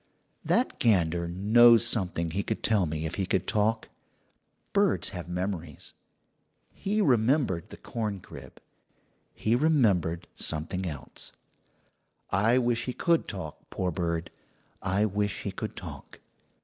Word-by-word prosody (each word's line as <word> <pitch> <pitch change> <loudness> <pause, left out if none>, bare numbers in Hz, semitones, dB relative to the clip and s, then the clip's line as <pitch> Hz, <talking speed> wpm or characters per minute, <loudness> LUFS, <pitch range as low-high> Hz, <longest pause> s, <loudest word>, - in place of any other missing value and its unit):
"That 250 +3 +1
gander 85 -6 +2
knows 115 +6 +6
something 90 -7 -1
he 95 +4 -1
could - - -4
tell 105 -6 +3
me 80 +1 -3
if 80 - -4
he 95 - -1
could 95 -1 0
talk. 110 +1 +1 0.9
Birds 200 -1 +2
have 90 -3 -7
memories. 90 -4 -4 0.8
He 210 +2 -1
remembered 125 - +2
the - - -10
corncrib 105 -5 -6 0.8
he 110 +2 +1
remembered 105 - +2
something 85 +4 -3
else. 75 -5 -8 1.0
I 110 +5 +3
wish 120 -1 +1
he 125 - -3
could 170 +4 +1
talk, 90 -7 -6
poor 90 -1 -2
bird! 85 -1 -2 0.5
I 95 +3 +1
wish 105 -1 -1
he - - -3
could - - -5
talk. - - -9
100 Hz, 125 wpm, -28 LUFS, 85-115 Hz, 1.0 s, knows